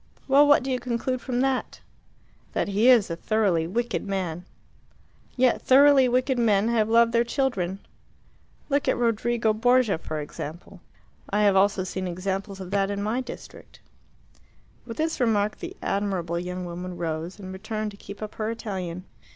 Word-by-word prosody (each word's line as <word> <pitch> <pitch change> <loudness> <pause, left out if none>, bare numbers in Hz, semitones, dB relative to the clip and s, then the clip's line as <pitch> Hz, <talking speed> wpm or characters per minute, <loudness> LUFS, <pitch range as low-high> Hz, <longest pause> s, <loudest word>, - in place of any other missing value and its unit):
"Well, 285 +2 +6
what 290 -3 +5
do 265 - -3
you 255 - 0
conclude 250 +1 -2
from 250 -1 -1
that?" 265 -1 -1 0.7
"That - - -1
he 210 +5 +3
is 230 -8 +5
a - - -1
thoroughly 185 -4 +1
wicked 235 +6 -2
man." 180 -4 -3 0.9
"Yet 255 -1 +3
thoroughly 270 -1 +6
wicked 255 +1 +1
men 215 -2 +3
have 220 -2 +1
loved 230 0 +5
their 235 0 +3
children. 235 -8 -1 0.9
Look 285 -1 0
at - - +2
Rodrigo 230 -1 +1
Borgia, 245 -3 +3
for 155 -1 -5
example." 160 +5 -8 0.5
"I 210 +1 +1
have 200 -2 +4
also 195 0 +3
seen 185 0 -4
examples 195 +2 -4
of 185 -1 -8
that 200 -1 +1
in 200 0 -3
my 225 +5 -1
district." 250 - -11 1.1
With 230 - -7
this 320 0 -1
remark 215 -4 +1
the - - -7
admirable 185 -4 -1
young 180 +1 -5
woman 175 +1 -6
rose, 165 +2 -4
and 190 -2 -8
returned 215 +2 -4
to - - -13
keep 200 +1 -9
up 215 - -6
her 215 0 -3
Italian. 185 -6 -5
210 Hz, 165 wpm, -25 LUFS, 185-240 Hz, 1.1 s, Well